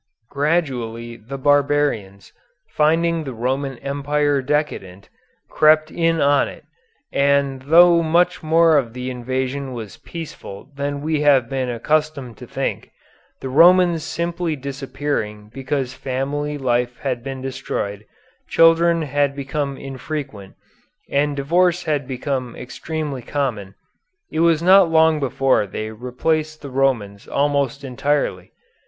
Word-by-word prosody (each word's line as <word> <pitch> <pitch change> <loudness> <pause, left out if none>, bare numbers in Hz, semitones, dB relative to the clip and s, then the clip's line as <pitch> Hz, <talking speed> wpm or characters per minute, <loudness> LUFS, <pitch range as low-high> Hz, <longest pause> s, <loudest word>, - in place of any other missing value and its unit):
Gradually 130 -7 -1
the 120 +5 -8
barbarians, 140 -8 0 0.4
finding 165 +2 +1
the 135 -4 -6
Roman 130 +3 -2
Empire 145 +1 0
decadent, 130 -10 -3 0.4
crept 155 0 +3
in 165 -1 +1
on 145 -1 +3
it, - - -11 0.5
and 140 -1 +2
though 170 +4 +6
much 175 +2 +2
more 160 -1 +4
of 115 -4 -5
the 125 +1 -5
invasion 130 +2 -3
was 110 -5 -8
peaceful 145 - -9
than 140 0 -3
we 155 -1 0
have 140 -5 +4
been 130 -2 -2
accustomed 140 0 -1
to - - -11
think, - - -3 0.5
the 130 - -4
Romans 170 +3 +5
simply 170 0 -2
disappearing 135 -6 -4
because 135 -1 -3
family 140 +3 -3
life 125 -2 0
had 130 -3 -2
been 135 -1 -6
destroyed, 115 -6 -4 0.5
children 165 0 +4
had 145 -1 0
become 140 0 -3
infrequent, 135 -6 -7 0.6
and 145 +1 +1
divorce 175 +5 +2
had 145 -4 -1
become 130 -2 -3
extremely 140 +2 -5
common, 115 -8 -3 0.6
it - - -2
was 165 -1 +3
not 185 -1 +6
long 160 -1 +4
before 135 -5 +1
they 110 +3 -5
replaced 155 +7 -2
the 140 - -7
Romans 120 -7 -1
almost 140 -1 0
entirely. 140 +3 -1
140 Hz, 125 wpm, -21 LUFS, 130-155 Hz, 0.6 s, though